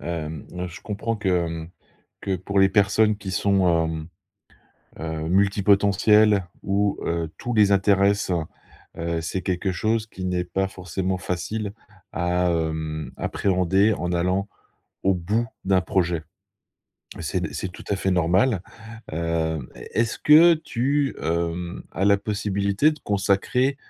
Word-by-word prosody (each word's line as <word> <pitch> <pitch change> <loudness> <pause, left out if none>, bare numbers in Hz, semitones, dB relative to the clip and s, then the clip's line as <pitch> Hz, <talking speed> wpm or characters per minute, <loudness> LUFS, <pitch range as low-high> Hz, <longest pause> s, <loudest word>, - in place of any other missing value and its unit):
hem, 80 -3 -5 0.2
je 85 - -11
comprends 105 +2 -3
que, 105 -2 -2
hem, 85 -2 -1 0.5
que 95 -1 -1
pour 100 +3 -2
les 95 0 +6
personnes 105 +1 +3
qui 95 -2 -7
sont, 95 -1 +2 0.2
hem, 80 0 -4 0.9
heu, 80 0 -4
multi-potentielles 100 +1 +4 0.2
où, 100 +1 +1
heu, 85 -1 -2
tout 120 - -4
les 105 -2 +4
intéresse, 100 0 +3 0.7
heu, 85 0 -2
c'est 95 +3 -3
quelque 95 +1 -1
chose 110 +4 0
qui 95 -3 -7
n'est 90 -1 0
pas 95 +2 -1
forcément 95 0 -3
facile 100 +3 -3 0.4
à, 90 0 0
hem, 80 -1 -2
appréhender 95 +2 +2
en 90 -2 -3
allant 90 +3 0 0.6
au 95 -1 +3
bout 105 +7 -1 0.2
d'un 95 -1 +3
projet. 85 -2 0 0.9
Mais - - -7
c'est 80 0 -2
c'est 95 - -3
tout - - -11
à 100 - +2
fait 95 -1 -1
normal, 90 +5 +2 0.5
hem, 80 -4 -1
est - - -11
est-ce 115 -1 -1
que 165 +3 +7
tu, 140 -1 -1
hem, 85 +1 -2
as 95 +4 -1
la 100 0 +5
possibilité 100 +5 +1
de 150 - -10
consacrer 105 +7 +1
95 Hz, 140 wpm, -24 LUFS, 85-105 Hz, 0.9 s, que